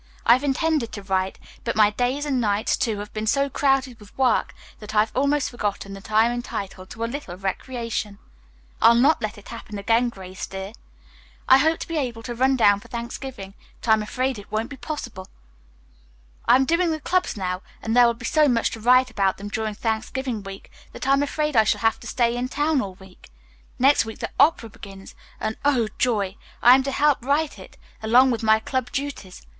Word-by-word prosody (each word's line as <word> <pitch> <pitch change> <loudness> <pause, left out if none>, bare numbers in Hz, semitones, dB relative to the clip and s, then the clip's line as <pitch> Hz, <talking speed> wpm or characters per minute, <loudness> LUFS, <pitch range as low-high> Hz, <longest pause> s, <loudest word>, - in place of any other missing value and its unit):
I've 245 +4 +5
intended 290 -3 0
to 205 - -7
write, 190 0 -1 0.3
but 235 - -2
my 210 -1 +5
days 250 +6 -1
and 265 -4 0
nights, 210 -1 +1
too, 220 -3 -1
have 205 +1 -8
been 215 0 -4
so 275 +4 +1
crowded 270 -3 +1
with 210 -1 -17
work 255 -3 +1 0.2
that 215 0 -8
I 210 - +6
have 215 +1 -2
almost 280 +2 +1
forgotten 205 -4 -3
that 195 +1 -11
I 220 +1 +5
am 235 - +1
entitled 200 -6 -6
to 225 - -6
a - - +1
little 235 -7 -6
recreation. 210 +1 -4 0.6
I'll 230 - +7
try 235 - +4
not 300 +4 +4
to 215 - 0
let 215 - -13
it 205 - -13
happen 225 -2 -8
again, 230 +4 +2
Grace, 190 -4 -8
dear. 195 +2 -7 0.7
I 265 - +7
hoped 320 +3 +2
to - - -13
be 330 - -3
able 235 -5 -4
to 240 - -5
run 260 +3 +2
down 205 -5 +4
for - - -16
Thanksgiving, 235 -3 -7 0.3
but - - -6
I - - +8
am 220 - +2
afraid 255 +2 -2
it 205 - -14
won't 225 +5 -2
be - - -6
possible. 245 -9 -7 1.2
"I - - +7
am 265 +1 +3
doing 335 +3 +2
the 315 -1 -2
clubs 360 -4 0
now, 185 -1 -3 0.2
and 225 +1 -2
there 245 -1 +7
will 235 - 0
be 235 +1 -9
so 305 +4 +3
much 235 -4 +1
to 225 - -7
write 250 +2 +4
about 195 -4 +1
them 205 +1 -7
during 215 0 -3
Thanksgiving 225 +2 -3
week 195 0 -10 0.2
that - - -6
I 270 - +5
am 275 - +3
afraid 300 0 -1
I 220 - +6
shall 215 - 0
have 225 -1 +2
to - - -10
stay 235 -1 +1
in 245 +1 -2
town 295 +2 +1
all 190 -4 -6
week. 190 - -17 0.5
Next 275 +3 +4
week 225 - -8
the - - -5
opera 285 -7 +4
begins, 195 -2 -12 0.3
and, 220 0 -3
oh, 260 -6 +2
joy! 205 -6 0 0.3
I 245 - +9
am 265 - +5
to 275 - -1
help 285 -2 +2
write 285 +3 0
it - - -13 0.2
along 245 +4 +5
with 235 - -2
my 220 -1 +4
club 255 +2 -3
duties. 275 -10 -6
235 Hz, 220 wpm, -23 LUFS, 210-265 Hz, 1.2 s, I